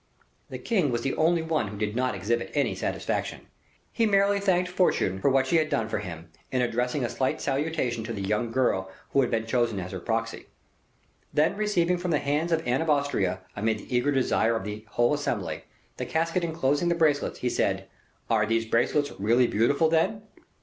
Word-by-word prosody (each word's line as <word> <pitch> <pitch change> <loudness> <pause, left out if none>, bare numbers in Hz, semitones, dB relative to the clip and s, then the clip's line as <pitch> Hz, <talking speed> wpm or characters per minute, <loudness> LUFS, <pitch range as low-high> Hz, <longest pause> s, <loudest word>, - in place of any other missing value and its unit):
The - - -5
king 190 -11 +1
was 120 -1 -1
the 135 - 0
only 165 +1 +2
one 160 -8 0
who 105 +1 -7
did 105 +1 -2
not 130 -1 0
exhibit 115 +5 -1
any - - +1
satisfaction. - - -3 0.5
He 230 - +1
merely 200 0 +3
thanked 185 -2 +2
Fortune 180 - +1
for 140 - +3
what 135 0 +3
she 150 +6 +2
had 155 -1 +1
done 115 -6 0
for 110 - -1
him, 85 -4 -8 0.2
in 130 - 0
addressing 125 +3 -1
a - - +1
slight 130 - -1
salutation 135 -5 -1
to 115 - -5
the 100 -3 -4
young 110 +4 -1
girl 115 -7 +1 0.2
who 140 - +4
had 125 - +1
been 115 -1 -1
chosen 115 -3 0
as 90 0 -6
her - - -5
proxy. - - -3 0.8
Then 155 +5 +2
receiving 180 -4 +1
from 180 0 -3
the 155 - +3
hands 145 +4 -1
of 160 -1 +1
Anne 125 +5 +1
of 165 - -2
Austria, 120 -11 +1
amid 110 +2 0
the 125 - -6
eager 125 +4 +2
desire 125 -4 +2
of 115 - -2
the 105 +2 -6
whole 120 +4 +2
assembly, 145 0 -3 0.3
the - - -4
casket 165 +2 0
inclosing 160 0 0
the 170 - +2
bracelets, 155 -4 +1
he 125 - +1
said, - - 0 0.4
"Are 110 -2 +2
these 115 +1 +1
bracelets 125 +6 +1
really 115 +5 +4
beautiful, 140 +9 +2
then?" 165 +6 +1
130 Hz, 200 wpm, -27 LUFS, 115-160 Hz, 0.8 s, who